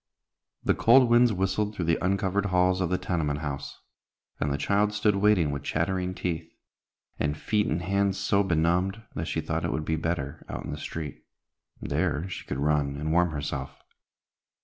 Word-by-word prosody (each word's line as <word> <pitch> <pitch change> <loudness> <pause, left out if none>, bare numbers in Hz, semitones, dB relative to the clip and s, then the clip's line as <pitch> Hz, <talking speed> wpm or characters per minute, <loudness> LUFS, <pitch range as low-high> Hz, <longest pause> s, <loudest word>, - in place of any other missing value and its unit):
The - - +3
cold 120 +1 +5
winds 120 0 +6
whistled 100 +2 -1
through 90 - -2
the 85 +2 +1
uncovered 100 +1 +1
halls 90 0 +2
of 90 - 0
the 90 - +1
tenement 80 -5 -1
house, 70 -2 -5 0.6
and 75 - 0
the 70 - 0
child 105 +7 +1
stood 105 -1 +2
waiting 100 -7 +3
with 70 -1 -3
chattering 90 +5 -1
teeth, 80 -3 -3 0.7
and 75 0 0
feet 105 +4 0
and 85 +3 -1
hands 100 +1 +1
so 100 +1 +2
benumbed 90 +4 +1
that 80 +2 -4
she 80 - -1
thought 80 +1 -2
it - - -1
would 80 - -2
be 80 +1 0
better 80 -4 -3
out - - -5
in - - -5
the - - -4
street. 75 -4 -6 0.6
There 75 +5 -1
she - - -7
could 70 - -3
run 70 -1 +1
and 75 +2 -2
warm 90 +1 +3
herself. 70 -3 -4
90 Hz, 180 wpm, -27 LUFS, 75-100 Hz, 0.7 s, winds